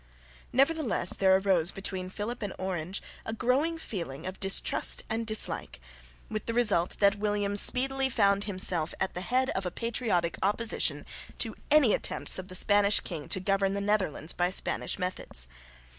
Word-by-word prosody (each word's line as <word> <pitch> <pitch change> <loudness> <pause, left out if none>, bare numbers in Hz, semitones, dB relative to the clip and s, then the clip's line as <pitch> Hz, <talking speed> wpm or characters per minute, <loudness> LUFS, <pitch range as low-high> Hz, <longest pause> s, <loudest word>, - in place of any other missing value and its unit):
Nevertheless 275 - +2
there 190 -1 +4
arose 190 -4 +1
between 190 -2 -5
Philip 215 +6 -6
and 205 -2 -4
Orange 185 0 -4 0.2
a 225 - -5
growing 265 +9 0
feeling 170 - -6
of 185 +1 -7
distrust 195 0 +2
and 225 0 -2
dislike, 215 - -2 0.5
with 215 -1 -6
the 230 - -2
result 205 -8 +2
that 200 0 +3
William 205 -1 -1
speedily 265 +5 +5
found 200 -4 +1
himself 185 -5 0
at 190 - -2
the 180 - -5
head 255 +6 0
of 190 - -3
a 180 - -2
patriotic 215 -6 -2
opposition 215 +3 +1 0.3
to - - -2
any 290 -7 +5
attempts - - 0
of 185 - -8
the 185 - -7
Spanish 205 +2 +4
king 160 -5 -7
to - - +2
govern 195 +1 0
the - - -2
Netherlands 200 -6 -1
by 175 0 0
Spanish 185 - -2
methods. 180 - -2
200 Hz, 160 wpm, -28 LUFS, 185-230 Hz, 0.5 s, speedily